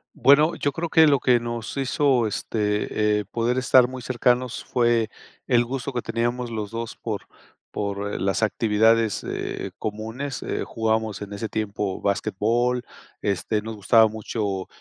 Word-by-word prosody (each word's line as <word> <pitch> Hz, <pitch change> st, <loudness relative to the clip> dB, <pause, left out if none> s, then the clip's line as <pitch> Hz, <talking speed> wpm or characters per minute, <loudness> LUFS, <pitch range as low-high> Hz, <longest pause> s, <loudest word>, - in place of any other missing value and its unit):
Bueno, 150 Hz, +4 st, +5 dB
yo 145 Hz, -, -1 dB
creo 165 Hz, +4 st, -4 dB
que 160 Hz, 0 st, +6 dB
lo 140 Hz, -2 st, +4 dB
que 125 Hz, -1 st, +3 dB
nos 120 Hz, +1 st, -5 dB
hizo, 135 Hz, -2 st, +2 dB
este, 105 Hz, 0 st, 0 dB
eh, 105 Hz, -, -4 dB
poder 120 Hz, +2 st, -1 dB
estar 130 Hz, -1 st, +5 dB
muy 130 Hz, 0 st, -7 dB
cercanos 125 Hz, 0 st, 0 dB
fue 120 Hz, -2 st, +2 dB, 0.4 s
el 120 Hz, -2 st, +4 dB
gusto 135 Hz, +2 st, -4 dB
que 120 Hz, -, -1 dB
teníamos 120 Hz, +2 st, -2 dB
los 105 Hz, -2 st, -4 dB
2, 115 Hz, 0 st, -5 dB
por 110 Hz, -3 st, -5 dB, 0.5 s
por, 100 Hz, 0 st, -3 dB
eh, -, -, -2 dB
las 95 Hz, +1 st, 0 dB
actividades, 110 Hz, 0 st, +2 dB
eh, -, -, -4 dB
comunes. 110 Hz, +6 st, -4 dB
Eh, -, -, -3 dB
jugábamos 110 Hz, -2 st, -1 dB
en 105 Hz, 0 st, -6 dB
ese 105 Hz, +2 st, -4 dB
tiempo 105 Hz, -2 st, -3 dB
basquetbol, 120 Hz, +5 st, 0 dB, 0.4 s
este, 105 Hz, +2 st, -1 dB
nos 110 Hz, +1 st, -6 dB
gustaba 110 Hz, +2 st, +5 dB
mucho 105 Hz, -3 st, -3 dB
115 Hz, 155 wpm, -24 LUFS, 105-125 Hz, 0.5 s, que